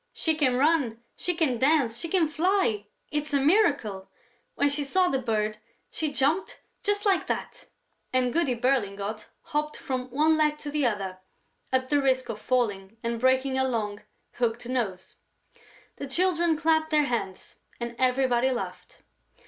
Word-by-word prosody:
"She 320 - 0
can 280 -5 +2
run, 270 -5 +2 0.2
she 355 - -2
can 285 -8 +1
dance, 265 -5 +2
she 335 - -4
can 335 -1 +2
fly! 315 - +1 0.2
It's 295 0 -1
a - - +4
miracle! 275 - +2 0.5
When 285 - +3
she 285 +1 0
saw 365 +6 +2
the 265 - 0
bird, 215 -3 -1 0.3
she 310 -2 -2
jumped, 285 +7 0 0.2
just 410 +1 0
like 390 -2 +2
that...." - - -4 0.4
And 255 -1 +1
Goody 290 -6 +1
Berlingot 215 -4 -1 0.2
hopped 300 -2 -2
from 255 -1 -4
one 310 +5 +3
leg 300 -1 +2
to 295 -1 -6
the 290 -3 +2
other 195 -4 -3 0.5
at 260 0 +1
the 290 -1 +3
risk 260 -2 +1
of 215 -2 -5
falling 220 -5 -1
and 235 0 -2
breaking 260 +1 +2
her 265 - +2
long, 210 -4 -2 0.3
hooked 235 -1 -1
nose. 215 -8 -3 0.8
The 280 - -5
Children 340 +1 +2
clapped 315 0 +2
their 305 -1 +3
hands 225 -8 -4 0.2
and 235 0 -5
everybody 255 -1 +2
laughed. 250 -2 -6
265 Hz, 155 wpm, -27 LUFS, 235-310 Hz, 0.8 s, a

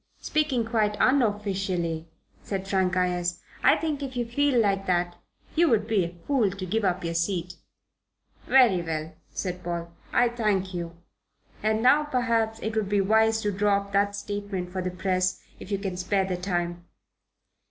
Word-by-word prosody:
"Speaking 285 -7 0
quite 215 -2 +1
unofficially," 195 - +1 0.3
said 195 -1 -4
Frank 190 -2 +1
Ayres, 180 -1 0 0.2
"I - - +5
think, 305 -3 -2
if 265 -2 -5
you 240 - 0
feel 265 +2 +2
like 195 -3 +1
that, 175 -1 +1 0.4
you 335 0 +4
would 215 -3 +2
be 215 -4 +2
a 170 +1 -5
fool 260 -8 +2
to 190 0 -6
give 220 +4 -1
up 185 -2 0
your 170 0 -2
seat." 175 +1 -2 0.9
"Very 240 -9 +5
well," 160 -1 -4 0.2
said 180 -1 -4
Paul, 170 -1 -4 0.2
"I 245 - +4
thank 210 -5 0
you. 170 -1 -5 0.6
And 220 +1 +1
now, 290 +4 +6
perhaps, 230 -5 0
it 220 0 -2
would 215 -3 0
be 205 0 +2
wise 220 +3 +3
to 210 - 0
draw 200 +1 +2
up 200 0 -6
that 200 +1 +2
statement 205 -3 -4
for 185 0 -3
the 185 - -2
press, 185 0 0 0.2
if 205 - -10
you 200 - +1
can 195 -2 -4
spare 190 +1 +1
the 185 -1 -2
time." 175 -1 -2
200 Hz, 175 wpm, -26 LUFS, 180-220 Hz, 0.9 s, now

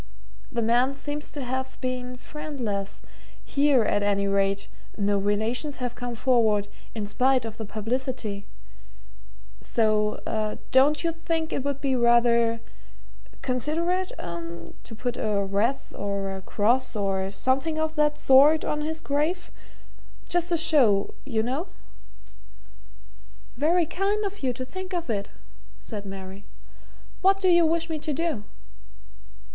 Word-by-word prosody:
The 235 - -1
man 245 +4 +3
seems 295 +1 -4
to 285 - -5
have 260 +1 -3
been 250 0 -3
friendless; 245 -10 -5 0.4
here, 280 -4 +3
at 205 - +1
any 200 -1 +1
rate 195 0 +1 0.3
no 200 -1 +1
relations 220 +8 0
have 245 -2 -3
come 245 -1 -5
forward, 220 -5 +2 0.3
in 215 -2 -2
spite 255 +3 +2
of 220 -1 -7
the 220 - -5
publicity 220 -1 -3 1.1
so 215 -1 0
don't 285 +4 +5
you 335 - +1
think 330 0 -2
it 265 - -1
would 280 -1 -2
be 270 -2 +1
rather 235 -1 +4 0.8
considerate, 335 +8 0
eh? 170 -1 -5 0.5
to 225 - -9
put 245 +2 -3
a 205 -2 0
wreath, 210 +7 -1
or 200 -1 -3
a 190 - -7
cross, 235 +7 +1
or 195 -2 0
something 260 +10 0
of 315 0 0
that 295 -1 +2
sort 285 +4 +6
on 300 - -1
his 315 +1 -2
grave 310 +5 -1 0.8
just 350 0 +1
to 345 - +2
show 265 -12 +4
you 225 -5 0
know?" 270 - -2 1.9
"Very 330 +6 +3
kind 400 +5 0
of 400 +1 -5
you 260 -2 +1
to 255 +1 -5
think 375 +6 -6
of 340 -6 -2
it," 200 -2 -2 0.5
said 205 -2 -7
Mary. 195 0 -8 0.8
"What 390 +1 +4
do 375 -1 +3
you 345 -2 +6
wish 330 +1 0
me 320 -2 -3
to 300 0 -2
do?" 300 -8 -2
255 Hz, 140 wpm, -26 LUFS, 210-300 Hz, 1.9 s, sort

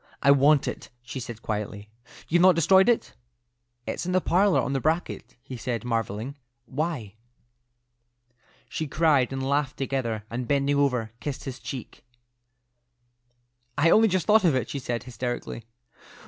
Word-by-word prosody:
"I 140 - +6
want 140 +1 +4
it," - - -5
she 130 +2 -6
said, 120 -2 -8
quietly. 105 -1 -4 0.4
"You've 175 +2 +3
not 185 -1 +6
destroyed 190 +6 +5
it?" 235 - +1 0.7
"It's - - -3
in 180 +1 -2
the 185 - +4
parlour, 185 +2 +3
on 135 - -1
the 135 - +1
bracket," 160 +5 -2
he - - -10
replied, 120 -1 -4
marvelling. 115 +1 -2 0.3
"Why?" 140 - -3 1.5
She 155 - -4
cried 145 -4 +2
and 135 0 -3
laughed 140 -1 0
together, 130 -5 -2
and 120 +2 -4
bending 140 +1 +1
over, 125 -6 +1
kissed 145 -3 -5
his 135 -1 -6
cheek. 130 -3 -8 1.7
"I 160 +3 +4
only 225 +1 +6
just 185 -4 0
thought 220 0 +5
of 165 -6 +3
it," 125 -3 -2
she 140 - -3
said, 120 -2 -3
hysterically. 120 -2 -5
135 Hz, 150 wpm, -26 LUFS, 120-160 Hz, 1.7 s, I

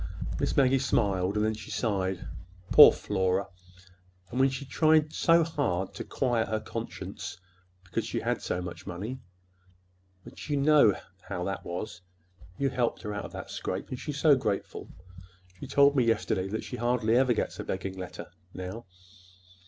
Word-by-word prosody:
Miss - - -1
Maggie 135 -1 +4
smiled; 100 -6 +1
then 110 +1 +1
she 110 - -9
sighed. 95 -5 -1 0.4
"Poor - - +11
Flora—and 90 +1 -4
when 135 +1 +5
she 135 +1 -5
tried 155 +2 +3
so 165 0 +4
hard 145 - -1
to - - -6
quiet 120 -4 0
her 110 - -1
conscience 110 -4 -6 0.5
because 90 - -3
she - - -3
had - - -1
so 90 - -2
much 85 0 -8
money! 105 +8 -5 1.0
But - - -11
you 145 - +1
know 140 -7 +5 0.3
how 90 - -3
that 95 +1 -3
was. 90 +1 -6 0.6
You 140 -1 0
helped 120 -2 -1
her 105 -2 -4
out 105 - -4
of - - -10
that - - -7
scrape. - - -4
And 125 - -5
she's 150 -2 -5
so 150 -1 +6
grateful! 100 -6 -3 0.7
She - - -7
told 140 +1 +5
me 130 - +4
yesterday 110 -4 0
that 110 +3 -3
she 125 - -6
hardly 120 -1 +1
ever 125 -1 +4
gets - - -3
a - - -3
begging 95 0 -4
letter 90 -2 -8 0.2
now." 95 +5 -6
110 Hz, 160 wpm, -28 LUFS, 95-130 Hz, 1.0 s, Poor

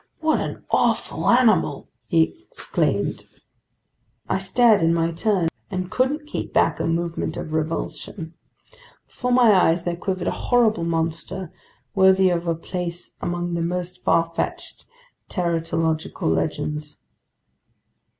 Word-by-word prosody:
"What 315 -1 +2
an - - -5
awful - - +1
animal!" 230 - +3 0.2
he 165 - +1
exclaimed. - - 0 1.0
I - - 0
stared 210 +2 +4
in 165 0 +3
my 165 0 +1
turn 185 0 +1 0.2
and 185 -1 -4
couldn't 270 +6 0
keep 300 - -5
back - - +2
a - - 0
movement 165 0 -2
of 155 - -5
revulsion. 160 +2 -3 0.7
Before 250 0 -3
my 245 -3 +6
eyes 175 -2 +3
there 175 -1 -2
quivered 185 0 -3
a - - +2 0.2
horrible 220 -8 +3
monster 165 +2 -3 0.4
worthy 190 -1 +5
of 170 0 -1
a 165 - +1
place 175 +1 -4
among 175 0 -2
the 170 - -1
most 180 +1 -3
farfetched 165 0 -1 0.4
teratological 165 - -1
legends. 150 - -3
175 Hz, 120 wpm, -23 LUFS, 165-195 Hz, 1.0 s, my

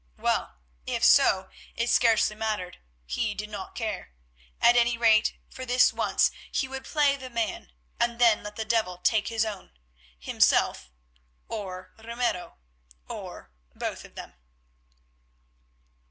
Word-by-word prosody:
Well, - - -1 0.3
if - - -2
so, 60 -1 +5 0.2
it 235 - -1
scarcely 225 -3 +3
mattered; 210 -5 -3 0.3
he 205 - -2
did 210 +1 -6
not 200 -2 -7
care. 220 - -4 0.5
At 240 - +6
any 240 0 +3
rate, 225 -2 +4
for 260 - -9
this 250 0 +4
once - - +2 0.2
he 265 - 0
would 265 0 -7
play 290 -2 +2
the 260 -2 -9
man 230 - -3 0.3
and 235 0 +1
then 235 -3 +4
let 210 0 -8
the 220 - -4
devil 215 -6 0
take 210 +3 +1
his 225 -1 0
own; 205 - -7 0.4
himself, 65 0 +2 0.6
or 190 -4 -6
Ramiro, 230 -5 -3 0.5
or - - -8 0.2
both - - -4
of - - -15
them. - - -9
220 Hz, 135 wpm, -27 LUFS, 205-240 Hz, 0.6 s, At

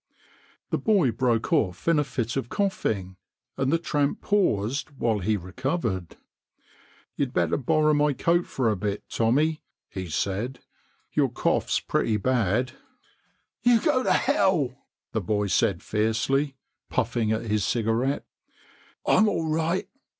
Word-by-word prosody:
The - - +1
boy 195 - +3
broke 115 +3 0
off 100 - 0
in 165 -2 +4
a - - +3
fit 120 -4 -3
of 135 -4 -2
coughing, 105 - -1 0.4
and 135 0 0
the 165 - +4
tramp 145 -3 0
paused 130 - 0
while 110 -4 +1
he 105 +3 +1
recovered. 100 - -3 1.0
"You'd 140 -3 -1
better 85 -1 +1
borrow 155 +3 +2
my 150 0 +3
coat 170 +6 +1
for 120 -4 0
a - - 0
bit, 100 +1 -3
Tommy," 150 +8 +2 0.3
he 95 -3 -6
said, 100 - -2 0.3
" - - -40
your - - +2
cough's - - 0
pretty 110 -2 0
bad." 120 +1 +1 0.5
" - - -44
You 240 -1 +5
go 255 - +2
to - - +1
hell 190 - +2
I 130 - -27 0.2
" - - -67
the 110 - -1
boy 105 +2 0
said 95 -2 +1
fiercely, 130 +6 0 0.3
puffing 115 -3 0
at 110 +1 0
his 105 -2 0
cigarette; 120 +5 0 0.4
" - - -30
I'm 220 -1 +4
all 165 -5 -1
right. 165 +3 0
125 Hz, 150 wpm, -26 LUFS, 105-155 Hz, 1.0 s, You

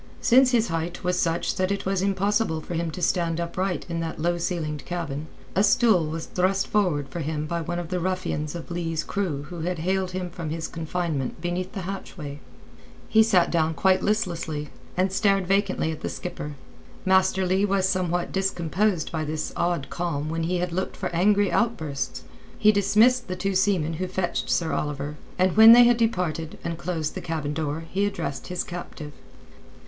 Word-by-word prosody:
Since 255 +2 +5
his 235 -2 +2
height 165 +1 -3
was 180 0 +1
such 165 0 0
that 185 +1 +1
it 200 - -2
was 195 -1 0
impossible 200 -2 +1
for 155 - -7
him 170 0 -1
to 175 +3 -6
stand 170 -1 +1
upright 175 0 -2
in 170 -1 -3
that 165 -1 -4
low 175 +2 0
ceilinged 155 -5 -2
cabin, 160 -4 -4 0.3
a 195 - +4
stool 215 -7 +4
was 160 +1 -4
thrust 190 +2 +1
forward 175 -9 +1
for 170 - -6
him 155 -1 -2
by 170 +2 -2
one 175 +1 -3
of 175 -2 -4
the 180 - -1
ruffians 175 -4 -2
of 170 0 -7
Leigh's 165 -2 -2
crew 175 -9 -2
who 175 - -6
had 175 +2 -2
haled 185 +3 0
him 180 -1 -4
from 170 -2 -5
his 160 +1 -3
confinement 160 -5 -3
beneath 175 +2 -3
the 195 - -4
hatchway. 175 -6 -6 0.7
He 220 - +6
sat 185 -6 +4
down 160 -1 +1
quite 185 +6 +3
listlessly, 170 -8 -1 0.3
and 185 +1 +2
stared 195 -1 +2
vacantly 195 -3 +1
at 155 - -7
the - - -2
skipper. 150 -4 -6 0.5
Master 190 0 +3
Leigh 190 +2 +2
was 195 -1 +2
somewhat 175 -2 0
discomposed 190 -1 0
by 160 -1 -2
this 155 0 -3
odd 170 -5 0
calm 155 -4 -2
when 165 0 -2
he 180 +2 0
had 180 0 -1
looked 185 +3 -3
for - - -2
angry 200 +3 +3
outbursts. 155 - -1 0.3
He 215 -1 +6
dismissed 215 +5 +4
the 185 - -3
two 195 +2 -1
seamen 185 -4 +2
who 185 +3 -3
fetched 180 -1 -2
Sir 165 -2 +1
Oliver, 145 0 -3 0.2
and 185 -1 +2
when 220 +1 +10
they 245 +1 +9
had 240 0 +5
departed 180 -8 -1
and 170 0 -4
closed 165 -4 -2
the - - -5
cabin 155 -3 -3
door 155 +1 -2
he 200 +2 +1
addressed 140 -8 -4
his 180 - -2
captive. 170 -4 -7
175 Hz, 190 wpm, -25 LUFS, 160-190 Hz, 0.7 s, when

